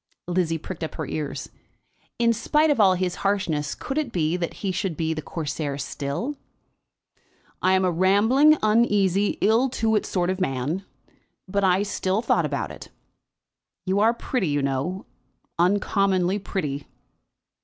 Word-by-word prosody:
Lizzie 175 -2 0
pricked 165 +1 -7
up 160 - -5
her - - -3
ears. 150 -2 -4 0.7
In 235 -1 +3
spite 300 +7 +2
of 285 - +1
all 190 -3 +5
his 180 0 -2
harshness, 170 -7 0
could 275 +3 -3
it 290 -6 -3
be 165 -3 0
that 175 -2 -3
he 190 - +1
should 180 -3 -2
be 160 -1 0
the 155 - -4
Corsair 145 -3 -4
still? 145 - -4 1.2
"I 185 - +3
am 190 0 +3
a 180 - +2
rambling, 220 - +4
uneasy, 205 -3 +2
ill 230 +6 +3
to 225 -2 0
do 210 - +2
sort 180 -1 0
of 190 0 -4
man; 150 +5 -2 0.6
but 190 0 +2
still 195 -1 -1
I - - +1
thought - - +2
about - - -3
it. - - -11 1.0
You 190 +1 +1
are 220 +2 +5
pretty, 240 -4 -2
you 145 -1 0
know, 140 +8 -2 0.5
uncommonly 190 0 +2
pretty." 150 -8 -4
185 Hz, 155 wpm, -24 LUFS, 165-210 Hz, 1.2 s, all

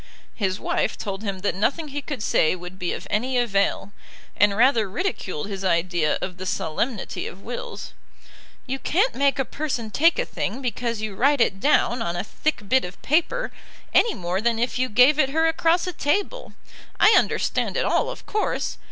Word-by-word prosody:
His 190 -3 -2
wife - - -1
told 195 -1 -5
him 200 -3 -4
that 205 - 0
nothing 285 - -1
he 290 +1 -4
could 275 -6 -5
say 155 - +2
would 180 +1 -10
be 175 - -1
of - - -5
any 250 +5 0
avail, 200 -4 0 0.4
and 205 -1 +3
rather 230 -4 +4
ridiculed 195 - -3
his 195 -1 -5
idea 170 -3 +1
of 180 -1 -5
the 185 0 -5
solemnity 190 +7 -2
of 190 - -10
wills. 240 +1 -6 0.7
"You 270 0 -3
can't 400 - +1
make 280 +1 +2
a 270 - 0
person 250 -8 -4
take 330 - +4
a - - 0
thing - - -4
because 235 -3 -2
you 215 -2 -3
write 280 +7 +2
it 195 -4 +2
down 250 -2 +2
on 170 -4 -2
a 175 - -2
thick 215 -1 -3
bit 260 +5 +3
of 180 0 -8
paper, 345 - +1 0.4
any 460 - +4
more 180 +2 -2
than 230 0 +1
if 240 +2 -1
you 255 0 +1
gave 250 +7 +5
it 270 -3 +3
her 320 +3 +2
across 330 +1 +2
a 365 - -4
table. 405 +12 -1 0.5
I 430 - +7
understand - - +1
it - - +1
all, - - +1
of - - -8
course. 425 - -2
235 Hz, 190 wpm, -24 LUFS, 195-295 Hz, 0.7 s, I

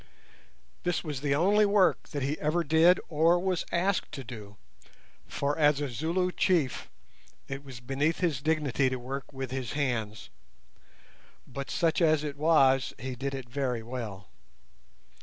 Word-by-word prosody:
This 175 -1 -1
was 145 -5 -5
the 140 -1 +1
only 200 +7 +4
work 200 -2 +3
that 145 -3 -3
he 145 +3 -2
ever 155 +3 +1
did 165 +3 +5
or 165 +2 +3
was 185 -1 -1
asked 185 +3 0
to 135 - -6
do, 105 -4 -10 0.7
for 145 +1 -1
as 150 -2 +4
a 145 - -1
Zulu 170 +9 -1
chief 165 -8 0 0.6
it 135 +1 -6
was 130 -4 -10
beneath 140 +6 0
his 160 -7 0
dignity 145 -4 +1
to 130 - -2
work 130 +3 -6
with 135 -2 -6
his 130 -3 -4
hands; 115 -7 -2 1.1
but 140 -1 -7
such 165 0 +1
as 155 -2 +3
it 145 -2 -4
was 140 -4 +3
he 130 +3 -5
did 135 +2 -4
it 130 -2 -7
very 125 -2 -2
well. 110 -5 -6
145 Hz, 155 wpm, -29 LUFS, 130-165 Hz, 1.1 s, did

